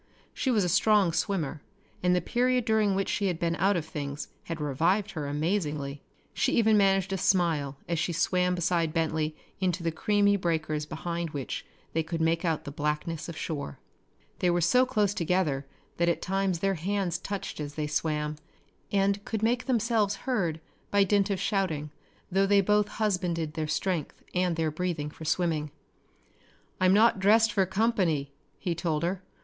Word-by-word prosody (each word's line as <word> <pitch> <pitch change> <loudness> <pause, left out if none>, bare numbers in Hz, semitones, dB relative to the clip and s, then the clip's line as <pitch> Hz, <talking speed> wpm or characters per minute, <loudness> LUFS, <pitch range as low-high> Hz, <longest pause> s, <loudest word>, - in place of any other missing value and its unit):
She 265 - -1
was 220 -5 +3
a - - +1
strong 200 -1 +4
swimmer 165 -6 -1 0.4
and 180 0 +3
the 180 - +2
period 250 +5 +1
during 215 -3 +2
which 195 0 0
she 200 - 0
had 180 -3 -1
been 170 0 0
out 195 +1 +3
of 160 - -3
things 145 -2 -5 0.2
had 165 -1 -5
revived 170 +9 +1
her 150 -4 -4
amazingly. 150 -3 -2 0.3
She - - +1
even 220 -2 +4
managed 195 -1 +3
a 190 - -1
smile 160 -7 +1
as 170 -2 -1
she 175 - 0
swam 180 +2 +1
beside 170 -2 0
Bentley 160 -1 0 0.2
into 180 -2 0
the 165 - 0
creamy 205 +4 +2
breakers 155 -4 -1
behind 170 +2 -3
which 140 -5 -5 0.3
they 160 - +2
could 165 +1 -4
make 165 +1 +1
out 165 -3 0
the 140 - -6
blackness 150 +3 -2
of 165 - -7
shore. 145 - -4 0.6
They 180 - +2
were 175 0 +2
so 250 +10 +4
close 210 -5 +1
together 165 -7 0 0.3
that 170 0 +2
at 170 - 0
times 190 -2 -1
their 195 0 +2
hands 185 0 -1
touched 195 -2 -5
as 145 -1 -5
they 150 - -1
swam, 150 0 -1 0.5
and 200 0 +1
could 220 0 -3
make 240 +2 +1
themselves 225 -4 +1
heard 185 - 0 0.3
by 200 0 +4
dint 200 0 +2
of 195 -2 -1
shouting, 180 -7 -1 0.4
though 195 +2 +3
they 200 0 +5
both 210 +1 +3
husbanded 180 -8 -1
their 155 -1 -2
strength 165 +1 -2
and 180 -1 +1
their 160 -1 0
breathing 155 -2 -2
for 160 - -10
swimming. 155 -3 0 1.1
"I'm 185 0 +4
not 220 -1 +5
dressed 220 +3 +4
for 200 -2 +3
company," 190 -9 +1 0.3
he 175 - -2
told 165 -2 -1
her. 180 +2 -1
175 Hz, 175 wpm, -28 LUFS, 155-200 Hz, 1.1 s, they